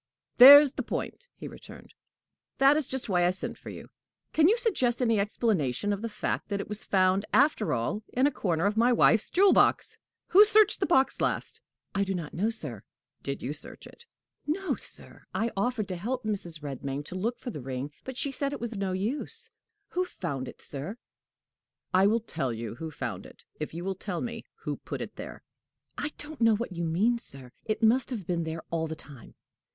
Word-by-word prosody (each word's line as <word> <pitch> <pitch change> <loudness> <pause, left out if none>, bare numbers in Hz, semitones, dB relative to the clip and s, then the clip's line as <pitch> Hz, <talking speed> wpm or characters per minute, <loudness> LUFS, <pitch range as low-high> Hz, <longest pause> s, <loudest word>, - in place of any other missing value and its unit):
"There's 285 +2 +11
the - - -4
point!" - - -5
he - - -8
returned. - - -13 0.6
"That 275 +2 +6
is 300 -3 0
just 260 -2 -4
why 180 -4 +2
I 175 - +4
sent 185 +1 -4
for - - -11
you! - - -10 0.4
Can 315 0 +5
you 450 - +4
suggest 300 - +1
any 230 -4 +2
explanation 205 - 0
of 200 - -4
the 230 - -3
fact 215 - -3
that 200 -1 -1
it - - -5
was 210 0 -5
found, 190 0 +2
after 280 -6 +3
all, 125 - -1
in 255 +2 +2
a 290 - +3
corner 170 - -1
of 205 +1 +1
my 235 +3 +4
wife's 225 -2 +4
jewel 390 +2 +5
box? - - +2 0.3
Who 400 +3 +9
searched 425 -1 +4
the 380 - 0
box 270 -5 +2
last?" - - -1 0.3
"I 200 - +1
do 195 -1 -2
not 165 -4 -5
know, 205 +6 0
sir." 150 - -3 0.4
"Did 140 - -5
you 135 +4 -2
search 150 - -5
it?" 475 0 -15 0.4
"No, 375 +6 -1
sir. - - -10
I 230 +1 0
offered 215 +1 -1
to 185 - -2
help 245 +8 -3
Mrs. 175 -8 -4
Redmain 140 0 -5
to - - -8
look 230 +6 -2
for 245 - -6
the 150 - -7
ring, 130 +2 -5
but 260 -1 -7
she 280 - +1
said 280 +1 -2
it - - -5
was 235 -1 -5
no 195 -2 -2
use. 215 +10 -1 0.4
Who 365 - 0
found 140 - -5
it, - - -11
sir?" 150 - -6 1.0
"I 190 +2 +5
will 225 +2 +2
tell 155 - -3
you 115 -1 -5
who 160 +7 -6
found 110 -10 -5
it, - - -17 0.2
if 150 - -4
you 170 +2 -6
will 195 - -1
tell 185 -2 -5
me 240 - -5 0.2
who - - -3
put - - -6
it - - -6
there." - - -9 0.5
"I 295 - -3
don't 295 -3 -8
know 225 -1 +5
what 230 -1 -4
you 170 -1 -3
mean, 210 +9 +1
sir. 135 - -10
It 215 +1 -2
must 240 +4 +3
have 225 -8 -4
been 170 -1 -1
there 160 0 -5
all 165 -1 -1
the 160 - -5
time." 140 -5 -13
205 Hz, 210 wpm, -28 LUFS, 165-250 Hz, 1.0 s, There's